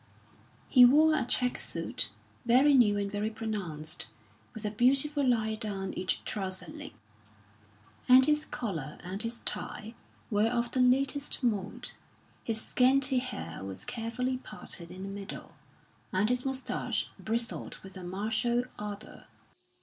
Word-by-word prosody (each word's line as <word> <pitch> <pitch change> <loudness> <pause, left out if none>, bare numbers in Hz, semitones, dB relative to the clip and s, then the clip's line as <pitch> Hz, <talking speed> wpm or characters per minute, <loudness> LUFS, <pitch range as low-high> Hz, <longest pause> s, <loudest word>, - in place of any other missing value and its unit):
He 250 -3 +7
wore 305 +6 +7
a 290 -5 +1
check 250 0 +2
suit, - - 0 0.3
very 255 +5 +5
new 220 -6 +5
and 200 -1 -2
very 210 +1 -1
pronounced, 180 - -3 0.4
with 220 - -8
a 210 - -1
beautiful 275 +6 +3
line 220 -4 +1
down 195 -3 -3
each 185 -3 -2
trouser 190 +3 -1
leg; 300 -1 -8 1.1
and 255 +1 +9
his 300 +1 +2
collar 160 - -4
and 185 +3 -4
his 230 +1 -3
tie 220 +2 -1 0.4
were 210 +1 +3
of 235 0 -1
the 260 - -1
latest 275 +3 +2
mode. 205 -5 -1 0.5
His 225 -1 -1
scanty 260 +2 +3
hair 255 - -5
was 95 -1 -6
carefully 250 +3 -2
parted 205 -7 -8
in 185 +2 -8
the - - -5
middle, 195 0 -7 0.6
and 195 +4 +2
his 250 +1 0
moustache 265 0 -1
bristled 230 +1 -2
with 190 0 -11
a 185 - -8
martial 220 +6 0 0.2
ardour. 210 0 -7
225 Hz, 140 wpm, -30 LUFS, 200-255 Hz, 1.1 s, and